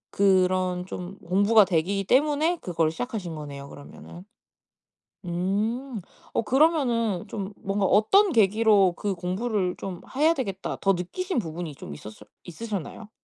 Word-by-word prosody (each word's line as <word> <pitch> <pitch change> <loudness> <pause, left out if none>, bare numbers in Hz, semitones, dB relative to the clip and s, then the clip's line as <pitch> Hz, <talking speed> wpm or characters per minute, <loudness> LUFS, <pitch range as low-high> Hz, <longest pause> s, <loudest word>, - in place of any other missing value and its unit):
그 190 -2 +4
그런 180 -1 -1
좀 185 +1 -7
공부가 200 +4 +4
되기 190 +3 0
때문에 300 - +2
그거를 165 -3 0
시작하신 200 -3 -5
거네요 140 -2 -8
그러면은. 170 +5 -12 1.0
음. 210 +8 -2 0.3
어 - - +1
그러면은 245 - +2
좀 200 -1 -5
뭔가 195 0 -1
어떤 345 - +4
계기로 210 - +4
'그 205 -2 -2
공부를 185 +1 -2
좀 185 -3 -6 0.2
해야 310 +4 +4
되겠다.' 195 - -4
더 195 0 +3
느끼신 290 - -3
부분이 165 -5 -5
좀 75 - -9
있었을 105 +8 -11 0.2
있으셨나요? 210 +2 -6
195 Hz, 300 characters per minute, -25 LUFS, 180-230 Hz, 1.0 s, 그